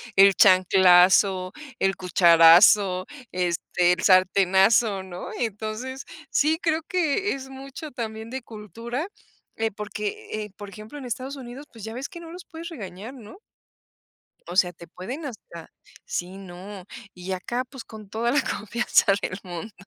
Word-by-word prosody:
El 195 -1 +7
chanclazo, 185 0 +5 0.3
el 195 0 +1
cucharazo, 180 +2 +6 0.3
este, 180 0 +1
el 180 - -5
sartenazo, 190 +2 +4
¿no? 180 -1 -8
Entonces, 225 +4 -4 0.2
sí 310 +4 +2
creo 320 -1 0
que 360 +3 0
es 265 -1 -8
mucho 275 +3 -9
también 220 -2 -6
de 265 +1 -5
cultura, 230 - -6 0.5
eh, 225 0 -1
porque, 210 0 -6 0.2
eh, 210 - -13
por 205 -1 -9
ejemplo, 215 +7 -11
en 275 - -8
Estados 255 +3 -5
Unidos, 260 +2 -9
pues, 225 -3 -13
ya 220 +1 -6
ves 260 +3 -5
que 350 - -10
no 330 -1 -10
los 355 0 -10
puedes 330 +1 -9
regañar, 215 - -8
¿no? 250 - -13 1.1
O 175 - -6
sea, 180 -2 +4
te 170 -1 -14
pueden 245 - -7
hasta 185 - -10 0.4
Sí, 180 +2 -4
no, 190 0 -10 0.3
y 180 +1 -5
acá, 240 +7 -3
pues 265 -4 -9
con 215 -3 -12
toda 235 +3 -1
la 290 - +3
confianza 220 0 +1
del 185 - -3
mundo. 180 +3 -7
210 Hz, 150 wpm, -24 LUFS, 185-255 Hz, 1.1 s, El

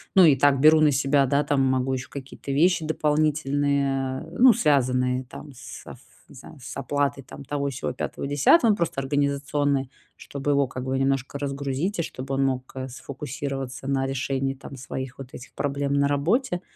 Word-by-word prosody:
Ну 190 -2 +8
и 150 -4 +6
так 140 0 +3
беру 155 +2 +6
на 150 - +5
себя, 140 +1 +2
да, 140 +3 +2
там, 140 -2 +1
могу 130 0 +1
ещё 130 +1 -4
какие-то 140 0 -8
вещи 165 +4 +3
дополнительные, 145 -3 0
ну, 245 +7 +6
связанные, 130 -5 +1
там, 145 +4 -11
с 135 +2 -11
аф 120 - -10 0.3
не - - -15
знаю, 145 +4 -13
с 130 +1 -8
оплатой 140 0 -1
там 140 - -11
того, 140 0 -2
сего, 130 - -4
5, - - -4
10, 180 - +4
ну, - - +2
просто 170 -6 -2
организационные, 140 0 0 0.3
чтобы 140 +1 -4
его 140 -1 +2
как 125 0 -6
бы 130 0 -1
немножко 135 +1 -1
разгрузить 140 +6 -2
и - - +3
чтобы 135 -2 -6
он 135 0 +1
мог, 130 -1 -2
э, 130 0 -5
сфокусироваться 135 0 -6
на 135 -1 0
решении, 135 0 -2
там, 135 +1 -11
своих 130 0 -7
вот 130 - -8
этих 125 - -11
проблем 140 0 -2
на 140 0 +3
работе. 175 - 0
140 Hz, 185 wpm, -25 LUFS, 135-145 Hz, 0.3 s, Ну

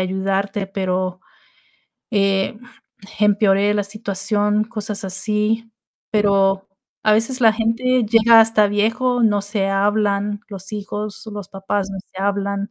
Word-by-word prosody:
ayudarte, 195 +1 -1
pero, 185 -2 -2 0.9
eh, 195 -1 +1 0.6
empeoré 205 -1 +3
la 205 -1 0
situación", 205 0 0
cosas 215 -3 -4
así. 215 +4 -1 0.4
Pero, 195 -2 +2 0.4
a 215 - +4
veces 230 +5 0
la 225 - +6
gente 235 +3 +1
llega 225 +1 +6
hasta 220 -1 +4
viejo, 230 +5 0
no 205 -3 +2
se 200 -1 -1
hablan, 205 +1 0
los 195 -1 -8
hijos, 210 0 -5
los 205 -2 -7
papás 195 0 -3
no 195 - -6
se 185 - -15
hablan. 200 +1 -2
205 Hz, 125 wpm, -20 LUFS, 195-215 Hz, 0.9 s, la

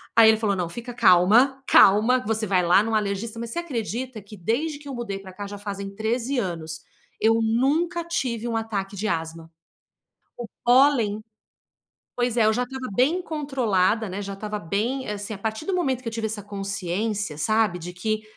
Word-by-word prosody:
Aí 225 -1 +8
ele 220 - +5
falou: 215 -3 0
"Não, 175 -3 -2
fica 235 +6 -7
calma. 230 +9 +5
Calma 225 +6 +6
que - - -10
você 220 0 0
vai 185 -2 +2
lá 180 +4 +5
num 225 0 -3
alergista", 215 +2 -1
mas 235 -1 -5
você 340 - -3
acredita 245 -5 -4
que 205 +1 -13
desde 285 - -1
que 285 0 -14
eu 275 - -5
mudei 230 -5 -4
pra 190 -1 -12
cá 205 +1 -6
já 205 0 -7
fazem 200 -1 -5
13 235 +5 -1
anos, 165 -6 -4 0.4
eu 225 +1 +3
nunca 295 +10 +1
tive 250 -9 -2
um 230 - -2
ataque 205 -3 -3
de 215 +3 -2
asma? 165 -1 -4 0.9
O - - -7 0.2
pólen 240 -5 +4 0.9
pois 245 -1 0
é, 225 -2 +4
eu 220 - +5
já 245 +3 0
estava 260 -2 -6
bem 305 - +2
controlada, 230 - 0
né, 195 +2 -4
já 200 0 -5
estava 210 +1 -5
bem 225 +10 -2
assim, 205 +1 -4
a 200 - -6
partir 220 +6 -4
do 390 - -1
momento 265 -8 0
que 240 - -9
eu - - -12
tive 225 0 -3
essa 210 -2 -5
consciência, 200 -2 -3
sabe, 215 +1 +1
de 175 +1 -7
que 215 +4 -2
220 Hz, 195 wpm, -24 LUFS, 200-245 Hz, 0.9 s, Aí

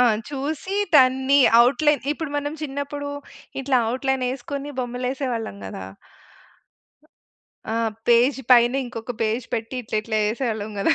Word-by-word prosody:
ఆ! - - +7 0.3
చూసి 295 +7 -4 0.2
దాన్ని 265 0 +5 0.3
ఔట్‌లైన్ 295 +2 +2
ఇప్పుడు 310 -1 -5
మనం 290 0 -2
చిన్నప్పుడు 285 0 -4 0.5
ఇట్లా 260 -1 +2
ఔట్‌లైనేసుకొని 265 +2 -2
బొమ్మలేసేవాళ్ళం 250 - -3
గదా! 95 0 -7 1.9
ఆ! - - -1 0.3
పేజ్ 240 +4 +4
పైన 240 0 +6
ఇంకొక 240 0 -6
పేజ్ 225 +2 -1
పెట్టి 230 +3 -4
ఇట్లా 215 - -3
ఇట్లా 220 0 -2
ఏసేవాళ్ళం 220 -3 -3
గదా! 195 - +3
255 Hz, 115 wpm, -23 LUFS, 235-280 Hz, 1.9 s, ఆ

